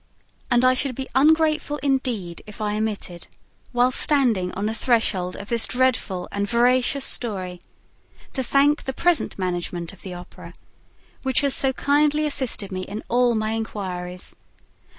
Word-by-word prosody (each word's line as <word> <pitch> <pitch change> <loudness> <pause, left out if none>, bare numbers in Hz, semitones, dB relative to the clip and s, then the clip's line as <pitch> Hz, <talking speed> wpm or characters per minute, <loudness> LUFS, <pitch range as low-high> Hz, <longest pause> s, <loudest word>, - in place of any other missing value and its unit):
And 240 +1 +3
I 255 - +6
should 255 0 -1
be 265 +1 -5
ungrateful 310 +1 +3
indeed 250 -11 -1
if 210 - -12
I 210 -1 -1
omitted, 210 -5 -4 0.4
while 245 0 +3
standing 240 -11 +3
on 200 - -3
the 220 - -1
threshold 220 -7 +1
of 200 - -9
this 235 -1 +2
dreadful 245 -8 0
and 200 0 -2
veracious 250 +3 +2
story, 185 -6 -2 0.7
to 265 - -2
thank 280 +3 +2
the 265 - -3
present 345 +3 +1
management 175 -1 -3
the 185 -2 -8
Opera, 175 0 -11 0.7
which 265 0 +1
has 280 -2 +3
so 270 - +5
kindly 295 +2 +2
assisted 260 -8 0
me 185 0 -3
in 205 +3 -6
all 245 -1 +3
my 215 0 -1
inquiries, 185 -5 -5
and - - -34 0.5
M. - - -37
235 Hz, 155 wpm, -23 LUFS, 195-265 Hz, 0.7 s, I